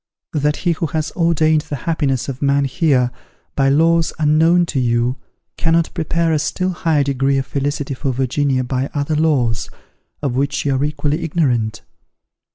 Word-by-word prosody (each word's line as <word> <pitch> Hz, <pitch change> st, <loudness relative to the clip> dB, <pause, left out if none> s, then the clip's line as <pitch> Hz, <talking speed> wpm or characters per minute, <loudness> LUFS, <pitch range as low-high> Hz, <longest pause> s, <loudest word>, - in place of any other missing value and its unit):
that 150 Hz, -1 st, +1 dB
he 175 Hz, -, 0 dB
who 165 Hz, 0 st, -1 dB
has 155 Hz, +1 st, -2 dB
ordained 160 Hz, -3 st, +2 dB
the 150 Hz, -1 st, -6 dB
happiness 135 Hz, -3 st, -1 dB
of 135 Hz, -2 st, -6 dB
man 140 Hz, 0 st, +2 dB
here, 130 Hz, -3 st, +1 dB, 0.4 s
by 135 Hz, -1 st, +3 dB
laws 165 Hz, +3 st, +3 dB
unknown 160 Hz, +3 st, +3 dB
to 140 Hz, -, -2 dB
you, 120 Hz, 0 st, +1 dB, 0.4 s
cannot 165 Hz, 0 st, +1 dB
prepare 165 Hz, 0 st, 0 dB
a 155 Hz, -, +2 dB
still 185 Hz, +5 st, -1 dB
higher 160 Hz, -4 st, +1 dB
degree 135 Hz, 0 st, +1 dB
of 135 Hz, -, -1 dB
felicity 145 Hz, +1 st, -2 dB
for 135 Hz, +1 st, -2 dB
Virginia 130 Hz, +1 st, 0 dB
by 130 Hz, +2 st, -2 dB
other 145 Hz, +2 st, -1 dB
laws, 135 Hz, -8 st, +1 dB, 0.5 s
of 135 Hz, -4 st, 0 dB
which 140 Hz, +2 st, -1 dB
you 140 Hz, -, +2 dB
are 135 Hz, +1 st, 0 dB
equally 150 Hz, +2 st, -1 dB
ignorant? 130 Hz, -10 st, 0 dB
145 Hz, 165 wpm, -18 LUFS, 135-160 Hz, 0.5 s, by